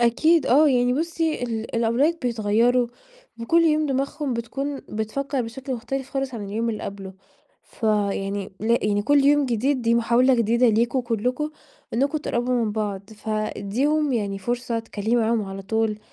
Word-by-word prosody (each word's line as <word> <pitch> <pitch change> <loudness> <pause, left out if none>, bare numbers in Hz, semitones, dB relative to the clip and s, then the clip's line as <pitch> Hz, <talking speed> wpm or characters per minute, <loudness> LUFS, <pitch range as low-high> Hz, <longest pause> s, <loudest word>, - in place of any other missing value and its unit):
أكيد 310 +8 +3
آه، 295 +4 +5
يعني 245 -1 +3
بُصِي 325 -2 -1
ال 225 -2 -4
الأولاد 245 +9 +2
بيتغيروا 235 +1 +2 0.5
وكل 330 +9 +3
يوم 310 -1 +3
دماغهم 275 +1 -2
بتكون 275 +5 -3
بتفكر 255 +5 -2
بشكل 260 +3 -5
مختلف 265 +3 -5
خالص 270 -2 -3
عن 210 -3 -5
اليوم 225 +4 -2
اللي 215 - -5
قبله، 195 -1 -7 0.5
فيعني 200 -3 -1
يعني 210 -2 +1
كل 285 +3 +3
يوم 290 -1 +4
جديد 250 +3 0
دي 230 0 +3
محاولة 240 +3 +4
جديدة 235 +1 +3
ليكم 235 +4 +2
كلكم 250 +5 -1 0.4
إنّكم 280 +5 +1
تقربوا 250 -3 -1
من 210 - -2
بعض، 205 -2 -4
فادّيهم 220 +8 -1
يعني 200 -4 -1
فرصة 240 +3 -2
اتكلمي 225 0 -2
معاهم 225 -1 +2
على 195 0 -7
طول، 220 +1 -1
235 Hz, 150 wpm, -23 LUFS, 220-270 Hz, 0.5 s, آه